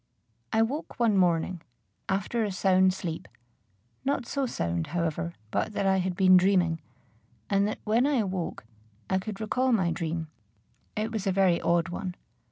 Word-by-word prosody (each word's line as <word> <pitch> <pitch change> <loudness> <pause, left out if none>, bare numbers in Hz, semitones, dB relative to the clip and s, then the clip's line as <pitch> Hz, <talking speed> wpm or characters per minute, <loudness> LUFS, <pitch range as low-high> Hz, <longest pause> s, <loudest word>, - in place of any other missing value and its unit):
I 220 0 +4
woke 270 +4 -4
one 230 -3 +3
morning, 175 -1 +2 0.5
after 200 +4 0
a 210 - -1
sound 190 0 +4
sleep, 175 -4 -5 0.8
not 275 -3 0
so 275 +2 -1
sound, 85 - -2
however, 170 0 -2 0.2
but 215 - -1
that 200 - -1
I 190 0 +4
had 185 -1 -1
been 185 0 +6
dreaming, 180 -4 +3 0.7
and 200 0 +3
that, 215 - -3
when 230 +5 +3
I 290 - +2
awoke, 190 - -2 0.5
I 190 - +3
could 205 +1 -6
recall 250 +4 +1
my 185 -7 +2
dream. 165 0 -3 0.7
It 215 +1 -2
was 215 -3 -3
a - - +3
very 185 -2 +3
odd 170 0 +2
one. 180 0 -4
190 Hz, 165 wpm, -28 LUFS, 175-215 Hz, 0.8 s, been